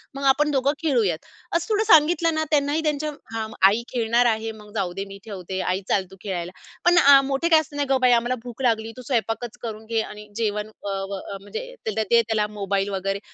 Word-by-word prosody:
मग 275 Hz, -, -5 dB
आपण 295 Hz, +2 st, +1 dB
दोघं 275 Hz, 0 st, +2 dB
खेळूयात." 230 Hz, -, +1 dB, 0.4 s
असं 340 Hz, 0 st, 0 dB
थोडं 430 Hz, 0 st, +2 dB
सांगितलं 330 Hz, -1 st, +5 dB
ना 315 Hz, -, +1 dB
त्यांनाही 290 Hz, +1 st, +2 dB
त्यांच्या 300 Hz, 0 st, -1 dB, 0.2 s
हां. 220 Hz, -1 st, -2 dB, 0.2 s
आई 215 Hz, +4 st, +1 dB
खेळणार 235 Hz, 0 st, +2 dB
आहे, 225 Hz, -1 st, +1 dB
मग 210 Hz, -1 st, -13 dB
जाऊ 190 Hz, -4 st, -1 dB
दे 195 Hz, +2 st, -4 dB
मी 195 Hz, 0 st, -10 dB
ठेवते 190 Hz, -3 st, -5 dB
आई 185 Hz, +1 st, -1 dB
चाल 195 Hz, -2 st, +2 dB
तू -, -, -11 dB
खेळायला. 180 Hz, -4 st, -4 dB, 0.3 s
पण 350 Hz, 0 st, +5 dB
आ 280 Hz, -4 st, +8 dB
मोठे 275 Hz, +5 st, -1 dB
काय 320 Hz, -2 st, +7 dB
असतं 300 Hz, -2 st, -7 dB
नाही 290 Hz, -1 st, -1 dB
"गं 270 Hz, -1 st, +3 dB
बया 250 Hz, -1 st, +5 dB
आम्हाला 240 Hz, +2 st, 0 dB
भूक 245 Hz, +1 st, -9 dB
लागली 225 Hz, -3 st, +1 dB
तू -, -, -7 dB
स्वयंपाकच 230 Hz, -1 st, -2 dB
करून 220 Hz, -2 st, -6 dB
घे. 225 Hz, 0 st, 0 dB
आणि 210 Hz, -1 st, -9 dB
जेवण" 210 Hz, -2 st, -1 dB
अ, 215 Hz, -1 st, -9 dB, 0.2 s
व 200 Hz, -, -3 dB
अ, 200 Hz, +1 st, -7 dB
म्हणजे -, -, -7 dB, 0.2 s
दे 220 Hz, +2 st, +3 dB
त्याला 220 Hz, -2 st, 0 dB
मोबाईल 200 Hz, 0 st, -1 dB
वगैरे. 195 Hz, 0 st, -2 dB
230 Hz, 215 wpm, -23 LUFS, 205-280 Hz, 0.4 s, आ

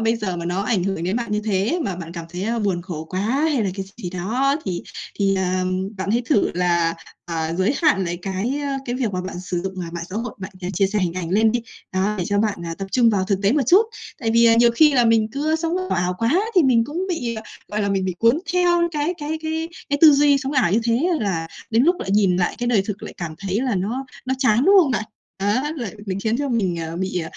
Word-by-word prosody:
bây 225 Hz, +1 st, +2 dB
giờ 200 Hz, -5 st, -3 dB
mà 170 Hz, -, -5 dB
nó 180 Hz, +3 st, -1 dB
ảnh 205 Hz, -5 st, 0 dB
hưởng 195 Hz, -3 st, -2 dB
đến 185 Hz, +5 st, 0 dB
bạn 235 Hz, -3 st, -3 dB
như 210 Hz, -, +1 dB
thế 210 Hz, -, 0 dB
mà 195 Hz, -, -3 dB
bạn 170 Hz, -1 st, -7 dB
cảm 170 Hz, -1 st, -7 dB
thấy 205 Hz, +6 st, -2 dB
buồn 180 Hz, -4 st, 0 dB
khổ 170 Hz, -4 st, -6 dB
quá 185 Hz, +3 st, -4 dB
hay 270 Hz, +4 st, +1 dB
là 195 Hz, -, 0 dB
cái 195 Hz, -1 st, -4 dB
gì -, -, -16 dB
gì 175 Hz, -, -3 dB
đó, 240 Hz, +11 st, 0 dB
thì 180 Hz, -3 st, -3 dB, 0.4 s
thì, 195 Hz, -1 st, +2 dB
à, 185 Hz, 0 st, 0 dB, 0.3 s
bạn 190 Hz, +1 st, -3 dB
hãy 235 Hz, +3 st, +2 dB
thử 205 Hz, -, +2 dB
là, 170 Hz, -2 st, +1 dB, 0.3 s
à, 165 Hz, -1 st, -2 dB
giới 190 Hz, +9 st, +1 dB
hạn 290 Hz, -, +3 dB
lại 175 Hz, 0 st, -3 dB
cái, 200 Hz, +8 st, -2 dB
ờ, 280 Hz, -1 st, -2 dB
cái 245 Hz, -, -3 dB
việc 245 Hz, -6 st, -1 dB
mà 185 Hz, -, -1 dB
bạn 185 Hz, -1 st, -6 dB
sử 180 Hz, -1 st, -3 dB
dụng 190 Hz, 0 st, -4 dB, 0.2 s
mạng 170 Hz, 0 st, -4 dB
xã 195 Hz, -, -4 dB
hội, 230 Hz, 0 st, -4 dB
bạn 190 Hz, +2 st, -6 dB, 0.2 s
chia 195 Hz, +3 st, +3 dB
sẻ 210 Hz, +2 st, -1 dB
hình 180 Hz, -4 st, 0 dB
ảnh 175 Hz, -2 st, -4 dB
lên 215 Hz, +3 st, +3 dB
đi. 240 Hz, -, 0 dB, 0.3 s
Đó, 190 Hz, +3 st, +1 dB
để 180 Hz, -, -1 dB
cho 205 Hz, -, 0 dB
bạn, 210 Hz, -3 st, 0 dB
à, 165 Hz, -, -4 dB
tập 195 Hz, -, -4 dB
trung 240 Hz, -3 st, +5 dB
vào 195 Hz, -3 st, +1 dB
thực 195 Hz, 0 st, 0 dB
tế 200 Hz, +2 st, +3 dB
một 285 Hz, -1 st, +2 dB
chút. 370 Hz, -, +7 dB, 0.4 s
Tại 225 Hz, -3 st, 0 dB
vì, 230 Hz, +1 st, +5 dB
à, 230 Hz, -, +6 dB
nhiều 235 Hz, 0 st, +6 dB
khi 300 Hz, +6 st, +5 dB
là 245 Hz, -2 st, +4 dB
mình 225 Hz, -1 st, +3 dB
cứ, 290 Hz, +4 st, -1 dB
ơ, 320 Hz, -, +3 dB
sống 330 Hz, +1 st, -2 dB, 0.2 s
ảo 180 Hz, 0 st, 0 dB
quá 255 Hz, +11 st, +2 dB
thì 360 Hz, -, +6 dB
mình 240 Hz, -4 st, +4 dB
cũng 335 Hz, +9 st, -3 dB
bị, 245 Hz, -10 st, -2 dB, 0.3 s
gọi 210 Hz, 0 st, -2 dB
là, 200 Hz, -, 0 dB
mình 195 Hz, -1 st, 0 dB
bị 185 Hz, -1 st, -2 dB
cuốn 230 Hz, +6 st, +4 dB
theo 350 Hz, -1 st, +3 dB
cái 300 Hz, +3 st, -1 dB
cái 305 Hz, +1 st, -3 dB
cái 320 Hz, +1 st, -2 dB, 0.2 s
cái 285 Hz, -, +1 dB
tư 310 Hz, -2 st, +10 dB
duy 285 Hz, 0 st, +4 dB
sống 270 Hz, +1 st, -3 dB
ảo 255 Hz, -11 st, +2 dB
như 220 Hz, -, +3 dB
thế 240 Hz, +9 st, +2 dB
là 165 Hz, -6 st, -1 dB, 0.2 s
đến 225 Hz, +2 st, +3 dB
lúc 350 Hz, +3 st, +3 dB
lại -, -, -4 dB
nhìn 195 Hz, -3 st, +3 dB
lại 180 Hz, -1 st, 0 dB
cái 240 Hz, -, -2 dB
đời 230 Hz, -5 st, +3 dB
thực 205 Hz, +1 st, -6 dB
lại -, -, -8 dB
cảm 170 Hz, -3 st, -5 dB
thấy 195 Hz, +3 st, -2 dB
là 255 Hz, -3 st, 0 dB
nó 220 Hz, +8 st, -2 dB, 0.2 s
nó 260 Hz, -, +1 dB
chán, 250 Hz, -1 st, +3 dB
đúng 390 Hz, -, +6 dB
không 290 Hz, -, -1 dB
bạn? 215 Hz, -4 st, -1 dB, 0.4 s
Đó, 215 Hz, +9 st, +1 dB
là 235 Hz, -8 st, -4 dB, 0.2 s
mình 195 Hz, 0 st, -3 dB
khiến 220 Hz, +2 st, 0 dB
cho 285 Hz, 0 st, -1 dB
mình, 200 Hz, -8 st, 0 dB
ờ, 165 Hz, 0 st, -5 dB
bị, 185 Hz, -1 st, -2 dB
210 Hz, 270 wpm, -22 LUFS, 185-260 Hz, 0.4 s, tư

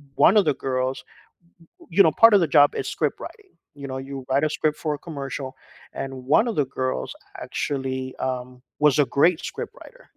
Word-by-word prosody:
1 195 Hz, -, +5 dB
of 205 Hz, -, +5 dB
the 150 Hz, -3 st, +1 dB
girls 130 Hz, 0 st, -2 dB, 0.8 s
w -, -, -18 dB
y 170 Hz, -, -13 dB
you 200 Hz, -, +9 dB
know, 160 Hz, -, +4 dB
part 230 Hz, +7 st, +6 dB
of -, -, +6 dB
the 170 Hz, -, +2 dB
job 145 Hz, 0 st, +6 dB
is -, -, -3 dB
script -, -, -2 dB
writing, 420 Hz, -4 st, -11 dB, 0.2 s
you 140 Hz, -1 st, -9 dB
know, 130 Hz, -1 st, -5 dB
you 135 Hz, 0 st, -7 dB
write 135 Hz, +2 st, +2 dB
a 155 Hz, -, +2 dB
script 155 Hz, -1 st, 0 dB
for 155 Hz, -2 st, -2 dB
a 145 Hz, -, -6 dB
commercial, 140 Hz, -3 st, -6 dB, 0.4 s
and 135 Hz, -, -4 dB, 0.3 s
1 225 Hz, -, +3 dB
of 230 Hz, -, -2 dB
the 145 Hz, -, +2 dB
girls, 130 Hz, -, -3 dB, 0.3 s
actually, 130 Hz, -2 st, -3 dB
um, 125 Hz, -1 st, -4 dB, 0.2 s
was 150 Hz, 0 st, +4 dB
a 145 Hz, -, +5 dB
great 165 Hz, +3 st, +4 dB
script -, -, -6 dB
writer, -, -, -15 dB
140 Hz, 210 wpm, -23 LUFS, 130-160 Hz, 0.8 s, you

